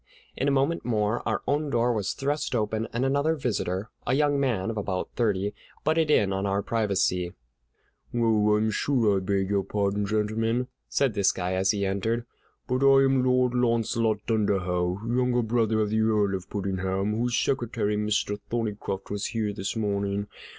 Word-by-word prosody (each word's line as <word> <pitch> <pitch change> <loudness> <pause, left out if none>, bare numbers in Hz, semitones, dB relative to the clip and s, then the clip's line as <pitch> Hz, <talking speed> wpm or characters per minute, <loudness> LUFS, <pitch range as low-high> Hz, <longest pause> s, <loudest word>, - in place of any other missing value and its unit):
In 135 - -1
a - - +3
moment 140 +5 0
more 110 -1 0
our - - -1
own 145 +2 0
door 120 -2 +2
was 105 -4 -1
thrust 145 -1 -2
open, 110 0 -1
and 120 +3 -1
another 140 +4 +2
visitor, 105 - -2 0.2
a 125 - +2
young 145 0 +2
man 115 -7 0
of 110 - -6
about 95 -3 -3
thirty, 105 -3 0 0.3
butted 160 0 +2
in 100 -10 +3
on 95 +1 -1
our 100 +1 0
privacy. 95 -5 0 0.8
"Oh, 110 -3 +3
I'm 110 +1 +1
sure 115 -4 +2
I - - +1
beg 95 0 -1
your 100 -1 +2
pardon, 100 +1 -1
gentlemen," 115 +4 0 0.2
said 135 -5 +1
this 100 -2 +3
guy 90 0 -3
as 95 +1 +1
he 100 -1 +1
entered, 110 +5 -1 0.4
"but 130 +2 0
I 135 0 +6
am 135 -1 +3
Lord 125 -1 +2
Launcelot 115 -3 +1
Dunderhaugh, 95 -3 0
younger 125 0 +1
brother 110 -1 +1
of 105 -1 -1
the 110 0 +2
Earl 105 -3 +2
of 95 0 -5
Puddingham, 95 +1 -1
whose 120 +1 0
secretary, 115 -5 0
Mr. 105 -1 0
Thorneycroft, 105 -4 -3
was 100 -1 -2
here 110 -3 -2
this 100 +1 -4
morning. 100 -2 -1
110 Hz, 170 wpm, -26 LUFS, 100-120 Hz, 0.8 s, I